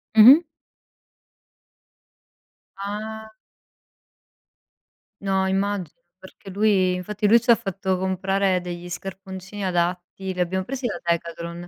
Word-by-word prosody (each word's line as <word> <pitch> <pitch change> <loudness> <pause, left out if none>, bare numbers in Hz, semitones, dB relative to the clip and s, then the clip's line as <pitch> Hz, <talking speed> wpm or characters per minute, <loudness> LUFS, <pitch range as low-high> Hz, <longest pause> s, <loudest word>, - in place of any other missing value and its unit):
Mh-mh. 265 +10 +9 2.3
Ah! 215 +2 -6 1.9
No 190 -1 +1
immagino, 195 -4 -2 0.2
perché 190 +1 -13
lui 195 -2 +2
infatti 205 +3 -2
lui 230 +3 +7
ci 240 - +4
fatto 195 -4 -2
comprare 190 0 0
degli 175 0 -7
scarponcini 190 +1 -7
adatti, 180 +1 -2
li 180 - -8
abbiamo 185 +2 0
presi 260 +5 -5
da 235 - -2
Decathlon. 170 0 -3
190 Hz, 100 wpm, -23 LUFS, 180-205 Hz, 2.3 s, Mh-mh